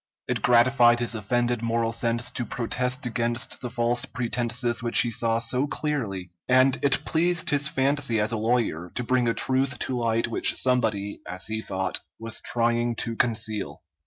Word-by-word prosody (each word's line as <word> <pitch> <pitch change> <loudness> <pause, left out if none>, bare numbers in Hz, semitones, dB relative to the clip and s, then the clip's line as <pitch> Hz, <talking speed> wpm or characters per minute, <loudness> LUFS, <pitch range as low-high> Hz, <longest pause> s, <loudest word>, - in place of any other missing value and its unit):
It - - -2
gratified 120 0 +4
his 120 -1 0
offended 120 +2 -1
moral 115 0 0
sense 115 +1 0
to 125 - -3
protest 125 +3 -2
against 120 0 -1
the 125 - -4
false 120 +1 0
pretenses 120 0 -1
which 120 0 +3
he 120 - -1
saw 115 0 +1
so 125 +4 0
clearly, 110 - -3 0.2
and 130 +1 +4
it 135 -1 +2
pleased 175 +2 +1
his 145 0 +1
fancy 135 -4 +1
as 105 +2 0
a - - -1
lawyer 110 -7 -1
to 125 - -2
bring 125 0 +1
a 115 - +1
truth 130 0 0
to 130 - -3
light 115 -1 0
which 115 - +2
somebody, 110 -6 0
as 90 0 -4
he 110 0 -3
thought, 95 -3 -3 0.2
was 115 0 -3
trying 120 0 0
to 115 +1 -3
conceal. 110 -10 -2
120 Hz, 170 wpm, -25 LUFS, 115-125 Hz, 0.2 s, gratified